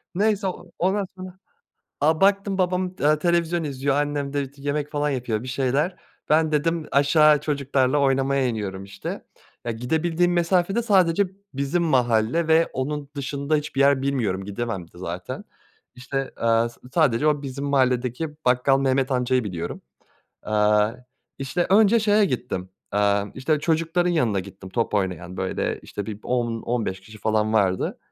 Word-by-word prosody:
Neyse, 205 0 +1
eee, 185 - -1 0.3
ondan 195 +2 +1
sonra 185 0 -9 0.6
A, 155 +2 +2
baktım 195 0 +2
babam, 180 0 0
eee, 150 +1 +3
televizyon 170 0 +1
izliyor 140 -1 -1
annem 145 -1 -1
de 140 -2 -2
t 140 0 -18
yemek 145 +1 -2
falan 145 0 0
yapıyor 120 -4 -2
bir 130 - -7
şeyler 135 +7 0 0.3
"Ben" 155 0 +3
dedim 165 +1 0
"Aşağı 150 +1 +5
çocuklarla 140 -2 +1
oynamaya 135 0 +2
iniyorum." 100 -4 -4
işte. 100 0 -7 0.4
Eee, 120 - 0
gidebildiğim 160 +9 0
mesafe 175 +2 +2
de 235 - +1
sadece 190 -3 +3 0.3
bizim 140 +6 0
mahalle 125 +1 +2
ve 160 +1 +4
onun 140 +2 -3
dışında 140 +2 -1
hiçbir 150 -2 -3
yer 140 -1 +4
bilmiyorum 110 -9 -1
gidemem 105 -1 -4
de 85 - -15
zaten. 90 0 -6 0.5
İşte, 135 +2 -4
eee, 115 0 +3
s 120 - -18
sadece 150 -4 +3
o 150 -2 +2
bizim 140 0 -5
mahalledeki 130 +1 +1 0.2
bakkal 125 +2 +3
Mehmet 135 0 +1
Amca'yı 125 -1 +1
biliyorum. 85 -4 -5 0.6
Eee, 105 +3 +2 0.3
işte, 135 +6 -1
önce 215 +3 +5
şeye 210 0 +4
gittim, 120 - -3 0.2
eee, 100 0 +2
işte, 150 +4 0
çocukların 165 +2 +1
yanına 120 - +1
gittim 95 0 -11
top 115 +2 -1
oynayan 90 -2 -2
böyle, - - -2
işte, 105 - -6
bir 105 -2 -6
10-15 115 -4 -2
kişi 110 +2 -14
falan 110 0 +1
vardı. 95 -4 +1
140 Hz, 150 wpm, -24 LUFS, 115-160 Hz, 0.6 s, Aşağı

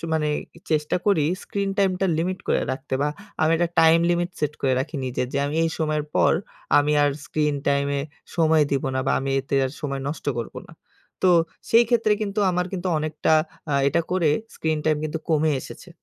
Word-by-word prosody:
মানে 155 -1 +1 0.3
এ - - -13
চেষ্টা 150 0 +1
করি 195 -7 +4 0.2
স্ক্রিন 200 -1 -2
টাইম 195 -1 +4
টা 195 - +2
লিমিট 185 +3 -1
করে - - +2
রাখতে 130 +1 -4
বা, 145 - +2 0.3
আমি 155 - +3
একটা 175 +1 +1
টাইম 165 0 +6
লিমিট 175 0 0
সেট 150 -1 0
করে 135 - +2
রাখি 150 +3 -4
নিজে। 125 -1 -2
যে - - -2
আমি 145 - -3
এই 165 - 0
সময়ের 155 -2 0
পর - - +4 0.5
আমি 145 +1 +2
আর 145 - +3
স্ক্রিন 150 -1 0
টাইম 140 0 +2
এ - - 0 0.4
সময় 160 -2 +4
দেব 140 -1 0
না 130 - +1
বা, - - +2
আমি 135 +1 -2
এতে 135 - -4
আর - - -5
সময় 140 -3 -3
নষ্ট 150 - -6
করব 115 - -5
না। - - -13 0.5
তো - - +4 0.4
সেইক্ষেত্রে 230 -1 +4
কিন্তু 205 0 -3
আমার 180 0 0
কিন্তু 185 -1 -2
অনেকটা 155 0 -1 0.4
আ - - 0 0.2
এটা 170 - +1
করে 180 -3 +2 0.3
স্ক্রিন 160 -1 -1
টাইম 155 -1 +3
কিন্তু 155 +1 -3
কমে 155 -1 +2
এসেছে। - - -11
155 Hz, 200 wpm, -24 LUFS, 145-175 Hz, 0.5 s, টাইম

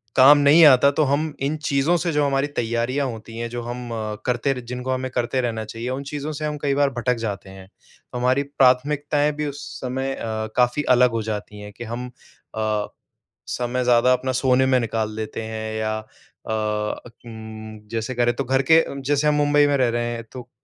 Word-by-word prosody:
काम 140 +3 +8
नहीं 145 +4 +6
आता, 140 0 +7
तो 150 +2 +1
हम 145 +3 0
इन 155 +2 -2
चीज़ों 140 +5 +2
से 170 - 0
जो 150 0 +2
हमारी 140 0 +1
तैयारियाँ 120 +4 -1
होती 115 -1 -8
हैं, 115 0 -3
जो 120 0 -5
हम 120 0 -6
अ, 110 -2 -3
करते 125 +2 +1
र 125 - -6
जिनको 125 +1 -3
हमें 130 0 -2
करते 125 +1 -1
रहना 115 -3 -3
चाहिए, 115 +3 -6
उन 130 +2 -3
चीज़ों 150 +1 -4
से 155 - -3
हम 150 0 -3
कई 140 -1 +2
बार 140 -1 +4
भटक 125 +1 +1
जाते 100 -2 -5
हैं। 95 -1 -12
तो 115 - -14
हमारी 130 +3 +2
प्राथमिकताएँ 145 +2 +2
भी - - 0
उस 145 0 -6 0.2
समय 130 +1 -2
अ, - - -6 0.3
काफ़ी 125 +4 +2
अलग 125 0 +4
हो - - -2
जाती 105 0 -6
है 105 0 -9
कि 110 +4 -9
हम 125 +1 -4 0.5
अ, 110 -1 -1 0.7
समय 125 +1 -1
ज़्यादा 125 +1 +4
अपना 130 +1 -1
सोने 130 0 +3
में 130 -1 +3
निकाल 110 -2 -2
देते 110 0 -4
हैं 110 0 -4
या 110 0 -1
अ, 110 0 -13 0.7
उम, 110 -1 -9
जैसे 115 +2 -3
करें, 120 0 +2
तो - - -2
घर 135 +2 +1
के 165 0 +7 0.2
जैसे 145 +2 +1
हम 150 - +4
मुंबई 145 0 +4
में 145 -1 +2
रह 130 -2 +2
रहे 120 0 -1
हैं, 115 0 -6
तो 125 -1 -9
125 Hz, 205 wpm, -22 LUFS, 115-140 Hz, 0.7 s, काम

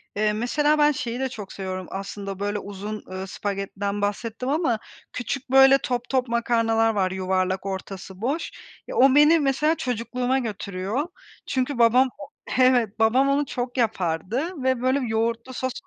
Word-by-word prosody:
Eee, 210 0 +1
mesela 295 +7 +1
ben 295 0 +5
şeyi 245 -3 -4
de 265 -1 -1
çok 210 -5 -8
seviyorum 185 -1 -5
aslında, 195 0 -6
böyle 205 0 -1
uzun, 205 +2 -6
eee, 190 +1 -5
spagettiden 200 +1 -3
bahsettim 225 +5 -2
ama 280 -8 +1 0.3
küçük 255 +2 -4
böyle 270 0 +8
top 245 -2 -3
top 260 -2 +1
makarnalar 230 -1 +2
var, 185 -2 +1
yuvarlak, 190 0 -1
ortası 190 0 -6
boş. 285 +8 -2 0.4
Ya, - - -6
o 265 +1 +5
beni 305 +3 +6
mesela 295 +3 +2
çocukluğuma 250 +1 -1
götürüyor. 205 - -3 0.4
Çünkü 260 0 -1
babam 250 +3 +5 0.5
Evet, 245 -4 +3
babam 255 +5 +4
onu 285 +1 +2
çok 245 0 -4
yapardı 230 - -1
ve 260 -2 +1
böyle 260 +2 +2
yoğurtlu 230 +3 -1
sos 260 0 -2
235 Hz, 150 wpm, -24 LUFS, 200-260 Hz, 0.5 s, böyle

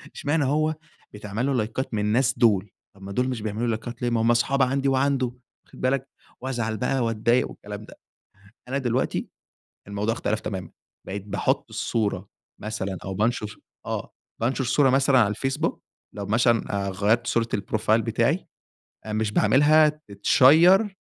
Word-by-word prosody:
إشمعنى 145 0 0
هو 155 +3 +1 0.4
بيتعمل 105 +3 -4
له 140 - +1
لايكات 120 +2 -2
من 110 - 0
الناس 120 +4 +2
دول، 105 -4 +3 0.2
طَب 100 - -19
ما 100 0 -8
دول 125 +5 0
مش 125 -4 -3
بيعملوا 110 +3 -2
لايكات 115 +1 -4
ليه 120 - +1
ما 115 -1 +1
هم 115 +1 +3
اصحاب 135 +4 +2
عندي 135 +1 +1
وعنده، 135 -1 +1 0.4
واخد - - -15
بالك، 135 +1 0 0.3
وازعل 120 -4 -2
بقى 130 +3 0
واتضايق 115 +2 +1
والكلام 105 +1 -9
ده، - - -14 0.7
أنا 135 +2 -1
دلوقتي 125 -1 -1 0.6
الموضوع 100 +2 -1
اختلف 110 -1 -2
تمامًا، 95 -5 -5 0.4
بقيت 100 +1 -5
باحط 100 - 0
الصورة 110 -3 -2 0.3
مثلًا، 100 -3 -4
أو 95 - -4
بانشر 105 +1 -1 0.3
آه، - - -4 0.3
بانشر 130 +3 0
صورة 135 +3 +3
مثلًا 135 0 +4
على 110 - +4
الفيسبوك 135 +9 -2 0.3
لو 100 -1 -5
مثلًا، 110 -2 +1
آآ، - - -1
غيّرت 105 +5 +1
صورة 115 -1 +1
البروفايل 110 +2 +1
بتاعي، - - 0 0.6
آآ، 110 - -4
مش 110 -1 -1
باعملها 145 +9 +5 0.2
تتشير 165 - +5
115 Hz, 155 wpm, -24 LUFS, 105-135 Hz, 0.7 s, باعملها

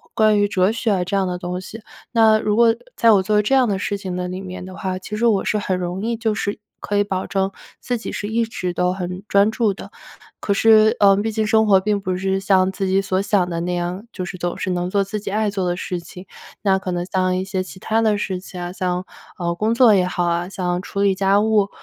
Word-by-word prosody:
关 215 -1 +4
于 205 - +3
哲 190 -1 +2
学 215 -5 0
这 195 +3 -2
样 190 -1 +1
的 180 -1 -3
东 180 +1 -4
西。 220 +4 -10 0.3
那 220 -2 +5
如 210 -1 0
果 230 -1 +5 0.2
在 230 - +5
我 200 -3 +5
做 210 +2 +2
这 240 - 0
样 255 -3 +4
地 200 - 0
事 205 - -2
情 190 -2 -5
的 180 0 -3
里 185 +1 -5
面 185 -1 -7
的 185 0 -9
话， 190 -2 -3
其 210 +3 -6
实 235 +2 +2
我 210 -4 +2
是 215 - +1
很 190 -2 -1
容 180 +1 -3
易 230 +1 -1
就 220 -1 0
是 205 0 -2 0.2
可 205 - -1
以 205 - +4
保 190 -2 -3
证 195 0 -1 0.3
自 245 - -2
己 - - -6
是 205 - -4
一 230 +2 0
直 185 -5 -4
都 180 +1 +1
很 180 0 -5
专 200 +2 +3
注 220 -2 +1
的。 - - -11 0.5
可 200 - 0
是， 220 +1 +5
呃， 195 -1 +6
毕 220 +2 -1
竟 215 0 -1
生 220 0 +4
活 200 -3 +5
并 205 0 0
不 185 -2 -2
是 190 0 0
像 190 -1 +2
自 195 0 -3
己 190 +1 +2
所 190 -1 -1
想 195 -2 +1
的 170 -1 -3
那 180 +1 -2
样， 175 +4 -3
就 185 - -4
是 180 - -7
总 175 0 -3
是 - - -2
能 180 0 -2
做 200 0 +2
自 200 +2 -4
己 200 - -6
爱 215 0 +1
做 195 -2 -2
的 175 - 0
事 180 0 -4
情。 180 +2 -12 0.3
那 195 -2 +3
可 190 -1 -4
能 175 0 -2
像 185 -1 0
一 185 - -1
些 190 -1 -2
其 185 0 -11
他 220 +3 0
的 215 -2 +2
事 190 -2 -2
情 180 -1 -9
啊， 175 0 -4
像， 180 0 -2 0.3
啊， 170 -1 -2
工 215 +5 0
作 235 -3 +6
也 185 -2 +3
好 180 -1 -2
啊、 170 +1 0
像 180 -1 -3
处 200 - -6
理 200 -1 +3
家 195 +1 +3
务。 210 -2 +2
195 Hz, 285 characters per minute, -21 LUFS, 185-210 Hz, 0.5 s, 呃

